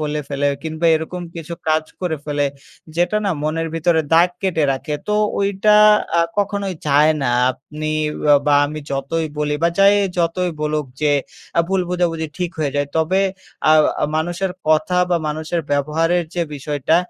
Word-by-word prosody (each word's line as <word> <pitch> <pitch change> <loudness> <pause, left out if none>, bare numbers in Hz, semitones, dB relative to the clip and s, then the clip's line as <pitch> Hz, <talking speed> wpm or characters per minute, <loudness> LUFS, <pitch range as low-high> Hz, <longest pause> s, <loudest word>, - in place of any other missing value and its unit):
বলে 150 0 -2
ফেলে, 145 0 -1 0.2
কিংবা 160 +1 -2
এরকম 175 +3 -5
কিছু 165 0 -7 0.2
কাজ 155 0 +2 0.2
করে 175 -4 -1
ফেলে, 145 -1 0 0.5
যেটা 175 +4 +1
না 195 - +1
মনের 165 +2 -1
ভিতরে 165 0 +2
দাগ 170 +2 +6
কেটে 175 -5 0
রাখে। 150 +3 -4
তো - - +1 0.3
ওইটা 200 +1 +2 0.5
আ - - +6 0.2
কখনোই 200 -2 -1
যায় 150 +2 +5
না, - - 0 0.3
আপনি 150 +4 -7 0.4
আ - - +8
বা 145 - +4
আমি 155 +1 -6
যতই 140 +4 -2
বলি 150 0 0
বা 170 - +5
যাই 200 +1 +6 0.2
যতই 175 +1 0
বলুক, 150 -1 -1 0.2
যে 150 -1 +3 0.5
আ - - +7
ভুল 190 0 +1
বোঝাবুঝি 170 -3 -1
ঠিক 180 -2 -1
হয়ে 145 -3 -1
যায়। 145 0 0
তবে 175 +5 +2 0.5
আ - - +7 0.4
মানুষের 175 +4 -2 0.2
কথা 155 +3 +2
বা 175 - +3
মানুষের 160 +3 -2
ব্যবহারের 165 +5 +1
যে 175 - 0
বিষয়টা, 145 +2 0
160 Hz, 165 wpm, -19 LUFS, 150-175 Hz, 0.5 s, আ